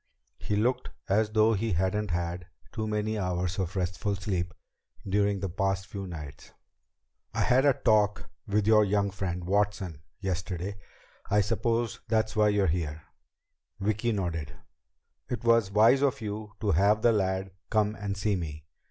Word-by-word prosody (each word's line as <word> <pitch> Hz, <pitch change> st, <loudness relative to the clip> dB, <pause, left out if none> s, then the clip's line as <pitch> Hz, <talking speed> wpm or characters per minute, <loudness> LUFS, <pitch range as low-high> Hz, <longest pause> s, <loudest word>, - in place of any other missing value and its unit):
He 105 Hz, -, -2 dB
looked 120 Hz, +5 st, +1 dB, 0.2 s
as 105 Hz, +2 st, +2 dB
though 110 Hz, +1 st, +4 dB
he 110 Hz, 0 st, 0 dB
hadn't 95 Hz, +4 st, 0 dB
had 85 Hz, +1 st, -2 dB, 0.2 s
too 110 Hz, -2 st, -3 dB
many 105 Hz, 0 st, -1 dB
hours 90 Hz, 0 st, -1 dB
of 95 Hz, 0 st, -2 dB
restful 95 Hz, +2 st, -1 dB
sleep 95 Hz, -3 st, -2 dB, 0.6 s
during 100 Hz, 0 st, +1 dB
the 100 Hz, -, -1 dB
past 95 Hz, +2 st, -1 dB
few 100 Hz, -1 st, -6 dB
nights. 75 Hz, -4 st, -9 dB, 0.8 s
"I -, -, +1 dB
had 130 Hz, +2 st, +4 dB
a 140 Hz, -, +6 dB
talk 105 Hz, -3 st, +2 dB, 0.2 s
with 105 Hz, 0 st, +1 dB
your 110 Hz, 0 st, +6 dB
young 100 Hz, 0 st, +1 dB
friend, 90 Hz, -2 st, -3 dB
Watson, 100 Hz, -4 st, 0 dB, 0.2 s
yesterday. 95 Hz, 0 st, -3 dB, 0.5 s
I 105 Hz, +1 st, +4 dB
suppose 115 Hz, +3 st, 0 dB
that's 110 Hz, -1 st, +1 dB
why 105 Hz, -1 st, +4 dB
you're 105 Hz, -1 st, +2 dB
here." 80 Hz, -2 st, -2 dB, 0.8 s
Vicki 110 Hz, +4 st, 0 dB
nodded. 85 Hz, -8 st, -3 dB, 0.7 s
"It 120 Hz, -2 st, -3 dB
was 115 Hz, -4 st, +4 dB
wise 110 Hz, +7 st, +5 dB
of 140 Hz, -2 st, +2 dB
you 105 Hz, -1 st, -5 dB
to 105 Hz, -, +1 dB
have 100 Hz, +5 st, +3 dB
the 120 Hz, -, +6 dB
lad 95 Hz, -2 st, 0 dB, 0.2 s
come 105 Hz, -1 st, +2 dB
and 100 Hz, -2 st, -4 dB
see 100 Hz, +1 st, +1 dB
me. 75 Hz, -4 st, -5 dB
100 Hz, 155 wpm, -28 LUFS, 90-110 Hz, 0.8 s, a